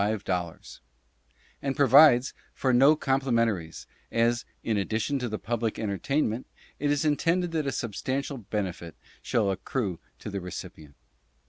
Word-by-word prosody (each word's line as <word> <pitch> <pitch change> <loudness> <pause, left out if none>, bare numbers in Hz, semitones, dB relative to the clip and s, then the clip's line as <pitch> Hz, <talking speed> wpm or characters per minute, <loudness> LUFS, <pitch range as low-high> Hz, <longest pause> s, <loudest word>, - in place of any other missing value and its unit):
00, 95 -5 -1 1.0
And 135 -1 -2
provides 135 -1 +6 0.2
for 130 -2 +1
no 135 +5 +6
complimentaries, 115 - 0 0.3
as, 115 +1 +1 0.2
in 110 - 0
addition 110 +7 -1
to 125 -1 -3
the 110 - -3
public 115 +1 -2
entertain 110 +8 0
ment, 115 +4 -4 0.3
it 145 - 0
is 145 +1 +1
intended 165 +4 +1
that 155 -3 -1
a - - +1
substantial 130 +5 -3
benefit 95 -6 -4 0.3
shall 105 -4 +1
accrue 95 -1 -3 0.2
to 105 - -7
the 100 -1 -3
recipient. 80 -4 -9
115 Hz, 135 wpm, -27 LUFS, 100-135 Hz, 1.0 s, provides